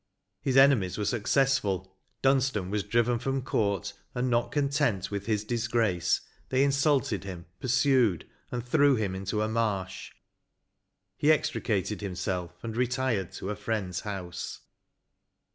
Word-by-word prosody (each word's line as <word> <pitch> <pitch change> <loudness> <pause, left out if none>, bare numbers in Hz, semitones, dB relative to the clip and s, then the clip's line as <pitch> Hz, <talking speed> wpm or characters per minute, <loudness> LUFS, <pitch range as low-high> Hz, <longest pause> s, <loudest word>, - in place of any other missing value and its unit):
His 135 -1 +1
enemies 130 -10 +5
were 105 - -1
successful 105 -5 +1
— - - -46
Dunstan 135 -8 +2
was 105 0 +1
driven 120 +2 +1
from 135 +1 -1
court, 100 -4 0 0.2
and, 125 +1 0
not 120 0 +1
content 140 -9 0
with 100 0 -4
his 105 -2 +1
disgrace, 115 -6 +1 0.3
they 130 +1 +3
insulted 140 - +2
him, 90 -3 -7
pursued, 130 - +2 0.2
and 120 -1 -4
threw 140 +3 +4
him 105 -5 -1
into 95 +3 -2
a - - 0
marsh; 105 -4 -2 1.1
he 150 - +5
extricated 105 - 0
himself, 90 -2 -3
and 115 -1 -4
retired 125 -6 0
to 95 - -4
a - - -3
friends 105 -4 -2
house." 90 -4 -6
110 Hz, 135 wpm, -28 LUFS, 95-130 Hz, 1.1 s, enemies